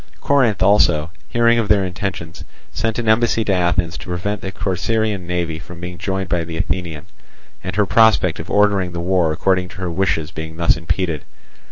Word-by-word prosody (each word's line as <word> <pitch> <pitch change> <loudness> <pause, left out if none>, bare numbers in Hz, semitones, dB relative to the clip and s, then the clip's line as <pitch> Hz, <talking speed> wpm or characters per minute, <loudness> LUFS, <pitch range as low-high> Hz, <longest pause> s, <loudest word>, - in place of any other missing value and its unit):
Corinth 130 -8 +2
also, 85 -6 +3 0.2
hearing 115 - +3
of 110 - 0
their 100 -2 +3
intentions, 90 -3 -5 0.3
sent 115 -1 -2
an 120 -2 -2
embassy 115 0 +3
to 100 - +1
Athens 90 -2 0
to - - -10
prevent 95 +3 -3
the 95 - -5
Corcyraean 100 +1 -1
navy 85 -2 -2 0.2
being 90 0 -7
joined 95 0 -2
by 85 -1 0
the 80 0 -6
Athenian, 85 -4 -3 0.6
and - - -4
her 105 0 +3
prospect 110 -6 +4
of 80 - -7
ordering 100 -3 +2
the 85 - -4
war 90 -2 +1
according 90 +3 +1
to - - -13
her 90 -2 -3
wishes 85 -3 0
being 80 -1 -7
thus 85 0 +3
impeded. 80 -1 -2
90 Hz, 180 wpm, -19 LUFS, 85-105 Hz, 0.6 s, prospect